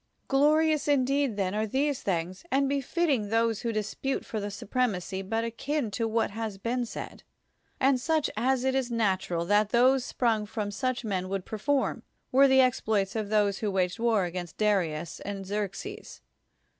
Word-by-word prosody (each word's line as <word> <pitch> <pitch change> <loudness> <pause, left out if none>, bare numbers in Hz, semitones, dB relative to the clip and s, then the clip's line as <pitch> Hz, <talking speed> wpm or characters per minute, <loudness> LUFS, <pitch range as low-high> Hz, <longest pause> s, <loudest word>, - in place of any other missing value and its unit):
Glorious 305 +2 +3
indeed, 275 -4 +2
then, 190 -1 0
are 215 +1 0
these 275 +4 0
things, 180 -1 -2
and 275 +1 +2
be 280 0 0
fitting 270 - 0
those 225 -1 +1
who 235 - -1
dispute 215 +5 -2
for 220 - -4
the 205 0 -3
supremacy, 200 -3 -2
but 225 +4 -2
akin 235 +2 -2
to 225 +3 -1
what 225 -1 0
has 220 -2 -4
been 240 +4 -2
said, - - -7 0.6
and 265 -1 +3
such 315 +2 +1
as 255 +3 +1
it 265 0 +1
is 265 -2 0
natu 210 -5 0
ral 170 -1 -1
that 205 +2 +3
those 255 +3 +4
sprung 225 -5 0
from 210 -1 -3
such 255 +2 -2
men 185 -3 -2
would 195 -1 -3
per 220 - -6
form, 280 +4 0 0.3
were 275 +2 +6
the 265 0 +6
exploits 220 -6 +1
of 215 -2 -2
those 205 -2 +2
who 215 - -1
waged 185 +1 0
war 225 -5 +2
against 175 -1 -6
Darius 175 -7 0
and 195 -1 -5
Xerxes. 210 - -5
225 Hz, 180 wpm, -28 LUFS, 200-265 Hz, 0.6 s, were